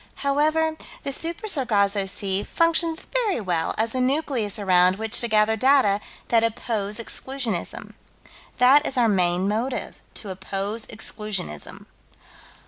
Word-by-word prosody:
However, 310 Hz, +3 st, +1 dB, 0.3 s
the 280 Hz, -, -2 dB
Super 335 Hz, +9 st, -2 dB
Sargasso 205 Hz, -, +2 dB
Sea 195 Hz, 0 st, -1 dB
functions 330 Hz, +4 st, +1 dB
very 470 Hz, -, 0 dB
well 175 Hz, -6 st, -1 dB
as 225 Hz, +1 st, +1 dB
a 255 Hz, -, 0 dB
nucleus 255 Hz, -6 st, -1 dB
around 185 Hz, -2 st, +4 dB
which 220 Hz, +3 st, 0 dB
to 235 Hz, -, 0 dB
gather 215 Hz, 0 st, +3 dB
data 255 Hz, -4 st, +3 dB, 0.3 s
that 230 Hz, -1 st, +3 dB
oppose 220 Hz, -3 st, -2 dB
Exclusionism. 235 Hz, -4 st, -3 dB, 0.6 s
That 265 Hz, +4 st, +6 dB
is 265 Hz, -, -2 dB
our 240 Hz, -2 st, +4 dB
main 180 Hz, -2 st, +1 dB
motive: 230 Hz, +6 st, -3 dB
to 205 Hz, -, -7 dB
oppose 200 Hz, +4 st, -4 dB
Exclusionism. 210 Hz, -, -4 dB
225 Hz, 130 wpm, -24 LUFS, 200-275 Hz, 0.6 s, That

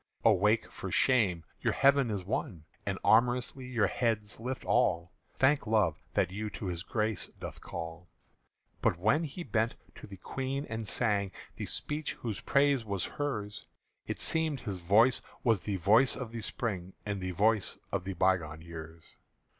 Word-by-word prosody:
Awake 105 Hz, +1 st, +4 dB
for -, -, -6 dB
shame, 100 Hz, -10 st, +3 dB, 0.2 s
your -, -, +1 dB
heaven 140 Hz, -2 st, +4 dB
is 100 Hz, -3 st, -2 dB
won, 90 Hz, -3 st, -3 dB, 0.2 s
And -, -, -1 dB
amorously 125 Hz, +3 st, +3 dB
your 120 Hz, -5 st, +2 dB
heads 105 Hz, 0 st, -1 dB
lift 130 Hz, +3 st, -4 dB
all: 85 Hz, +1 st, +2 dB, 0.2 s
Thank 135 Hz, -1 st, +3 dB
Love, 100 Hz, -8 st, +2 dB
that -, -, +2 dB
you 105 Hz, +2 st, -3 dB
to -, -, -6 dB
his 90 Hz, -2 st, -2 dB
grace 110 Hz, 0 st, -1 dB
doth -, -, -7 dB
call!_" 85 Hz, +1 st, -7 dB, 0.7 s
But -, -, +2 dB
when 125 Hz, -, +2 dB
he 165 Hz, +4 st, -6 dB
bent 115 Hz, -3 st, 0 dB, 0.2 s
to -, -, -11 dB
the 100 Hz, -1 st, -10 dB
Queen, 135 Hz, +8 st, -3 dB
and 110 Hz, -4 st, -4 dB
sang 100 Hz, -5 st, +2 dB, 0.3 s
The -, -, -4 dB
speech 150 Hz, 0 st, -1 dB
whose 110 Hz, -4 st, -5 dB
praise 140 Hz, -3 st, +3 dB
was 100 Hz, -4 st, -2 dB, 0.2 s
hers, 105 Hz, -8 st, -3 dB, 0.4 s
It -, -, -3 dB
seemed 160 Hz, -4 st, +2 dB
his 100 Hz, -5 st, -4 dB
voice 110 Hz, +9 st, +4 dB, 0.2 s
was 115 Hz, -5 st, +3 dB
the 100 Hz, +2 st, -3 dB
voice 105 Hz, +8 st, +4 dB
of 125 Hz, -3 st, -6 dB
the 115 Hz, -1 st, -5 dB
Spring 100 Hz, -6 st, -3 dB
And 100 Hz, -2 st, -3 dB
the 90 Hz, -, -2 dB
voice 105 Hz, +3 st, +1 dB
of -, -, -1 dB
the 95 Hz, +1 st, -4 dB
bygone 85 Hz, -4 st, +1 dB
years. 80 Hz, -1 st, -10 dB
105 Hz, 165 wpm, -31 LUFS, 95-125 Hz, 0.7 s, Awake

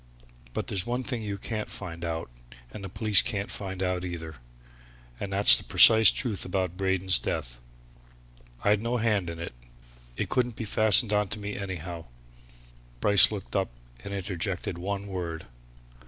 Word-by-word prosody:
But -, -, -3 dB
there's 95 Hz, -3 st, -2 dB
one 125 Hz, +4 st, -3 dB
thing 125 Hz, -3 st, -3 dB
you 100 Hz, -2 st, -5 dB
can't 110 Hz, +1 st, -5 dB
find 85 Hz, 0 st, -7 dB
out, 80 Hz, -6 st, -4 dB, 0.4 s
and 100 Hz, -, -9 dB
the 95 Hz, -, -6 dB
police 105 Hz, +1 st, +3 dB
can't 105 Hz, -4 st, -4 dB
find 95 Hz, -1 st, -5 dB
out 90 Hz, -1 st, -2 dB
either, 80 Hz, -4 st, -7 dB, 0.8 s
and 100 Hz, -, -5 dB
that's 100 Hz, +1 st, +8 dB
the -, -, -1 dB
precise 110 Hz, -2 st, +7 dB
truth 115 Hz, -7 st, -2 dB
about 90 Hz, -1 st, -3 dB
Braden's 95 Hz, -1 st, +3 dB
death. -, -, -4 dB, 1.0 s
I'd 105 Hz, 0 st, +2 dB
no 120 Hz, +2 st, -1 dB
hand 105 Hz, -6 st, 0 dB
in 85 Hz, -, -7 dB
it 85 Hz, -4 st, -7 dB, 0.6 s
it -, -, -2 dB
couldn't 125 Hz, -2 st, -1 dB
be 115 Hz, -, -6 dB
fastened 110 Hz, +1 st, +4 dB
on 105 Hz, -1 st, +1 dB
to 105 Hz, -, -6 dB
me, 105 Hz, 0 st, -6 dB
anyhow." 90 Hz, -4 st, -6 dB, 0.9 s
Bryce 100 Hz, -, +5 dB
looked 105 Hz, -3 st, -7 dB
up 95 Hz, -1 st, 0 dB, 0.3 s
and -, -, -7 dB
interjected 95 Hz, -1 st, -3 dB
one 100 Hz, +2 st, -4 dB
word. 85 Hz, -5 st, -6 dB
100 Hz, 160 wpm, -27 LUFS, 90-105 Hz, 1.0 s, that's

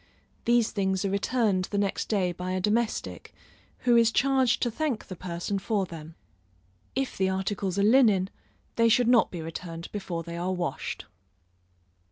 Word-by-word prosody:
These 235 Hz, -1 st, +3 dB
things 190 Hz, -1 st, 0 dB
are 195 Hz, -, 0 dB
returned 200 Hz, -2 st, +1 dB
the 205 Hz, -, -4 dB
next 200 Hz, -1 st, -1 dB
day 190 Hz, -5 st, +1 dB
by 180 Hz, +1 st, -4 dB
a 185 Hz, -, 0 dB
domestic, 215 Hz, +4 st, -1 dB, 0.5 s
who 245 Hz, -1 st, +4 dB
is 230 Hz, -1 st, +5 dB
charged 260 Hz, -1 st, +3 dB
to 240 Hz, -, 0 dB
thank 275 Hz, -2 st, -2 dB
the 185 Hz, -, -8 dB
person 180 Hz, +3 st, -3 dB
for 200 Hz, -1 st, 0 dB
them. 160 Hz, -2 st, -10 dB, 0.8 s
If 270 Hz, 0 st, -1 dB
the 190 Hz, 0 st, +2 dB
articles 190 Hz, 0 st, -2 dB
are 200 Hz, -, +3 dB
linen, 210 Hz, -5 st, +4 dB, 0.5 s
they 230 Hz, 0 st, +5 dB
should 240 Hz, +1 st, +4 dB
not 240 Hz, -2 st, +5 dB
be 170 Hz, -3 st, -6 dB
returned 165 Hz, +1 st, -7 dB
before 180 Hz, -5 st, -4 dB
they 170 Hz, +1 st, -7 dB
are 180 Hz, +2 st, -1 dB
washed. 175 Hz, -2 st, -4 dB
200 Hz, 165 wpm, -27 LUFS, 180-230 Hz, 0.8 s, is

